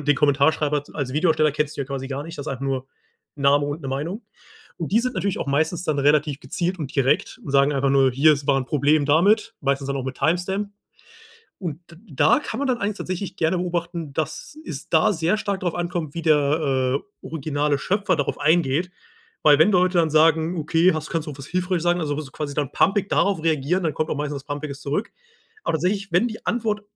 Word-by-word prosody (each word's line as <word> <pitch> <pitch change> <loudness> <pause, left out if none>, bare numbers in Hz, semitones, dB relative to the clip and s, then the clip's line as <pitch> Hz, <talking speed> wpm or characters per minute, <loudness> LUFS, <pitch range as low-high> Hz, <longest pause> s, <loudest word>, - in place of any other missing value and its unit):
mit 145 - -7
den 145 - +5
Kommentarschreiber 145 +1 +2
als 135 -4 -3
Videoersteller 155 -1 +2
kennst 150 0 -2
du 140 - -1
ja - - -5
quasi 135 -1 -5
gar 135 +1 -4
nicht. 165 -1 -9
Das 145 - -6
ist - - -3
einfach 135 0 -5
nur 135 -1 -2 0.5
Name 145 0 +3
und 145 +3 -4
'ne 135 - -5
Meinung. 155 - -3 0.6
Und 165 - -4
die 220 +4 +4
sind 255 +1 -2
natürlich 190 +1 -1
auch - - -3
meistens 155 +5 0
dann 155 -4 0
relativ 145 0 +2
gezielt 180 +4 -2
und 140 -3 -5
direkt 135 0 +1
und - - -6
sagen 140 +1 +4
einfach 135 0 +1
nur: 135 -1 +4
„Hier 140 +5 +5
es 140 -1 -3
war 140 -1 +3
'n 130 - -2
Problem 145 +2 +2
damit“, 200 +10 +3
meistens 140 0 0
dann 140 - -1
auch 130 - -4
mit 130 -1 -5
Timestamp. 180 +6 0 0.9
Und 165 -6 -5
d - - -13
da 145 - +3
kann - - -5
man 280 - -1
dann 250 -2 0
eigentlich 205 0 -2
tatsächlich 185 0 -4
gerne 165 -1 +1
beobachten, 170 -3 -3
dass 160 - -4
es 155 +3 -7
da 170 +6 +4
sehr 170 +4 +1
stark 200 -2 -2
darauf 175 -2 -2
ankommt, 175 -3 -3
wie 170 - -4
der, 140 -4 +2
äh, - - -20 0.2
originale 145 -2 -1
Schöpfer 195 +4 0
darauf 145 -3 -2
eingeht. 160 +2 +2 0.5
Weil 150 -1 +6
wenn 180 +7 +5
Leute 180 -1 +3
dann 160 -1 +2
sagen: 160 +2 +3
„Okay, 165 +3 +3
hast 155 0 -5
kannst 165 -1 -2
du 150 - -5
was 135 - -8
hilfreiches 180 +1 -1
sagen." 175 0 +2
Also 145 -2 -2
so 145 -4 -8
quasi 145 -1 -5
dann 145 -3 -1
pampig 200 0 +2
darauf 195 -5 +1
reagieren, 165 +3 +1
dann 160 -3 0
kommt 155 +2 -2
auch - - -2
meistens 145 -1 -3
was 135 - -9
Pampiges 145 -1 -5
zurück. 145 +11 -2 0.5
Aber - - -1
tatsächlich, 195 +3 -1
wenn 180 +8 +3
die 220 -2 -8
Antwort 220 -3 0
155 Hz, 225 wpm, -23 LUFS, 140-180 Hz, 0.9 s, Weil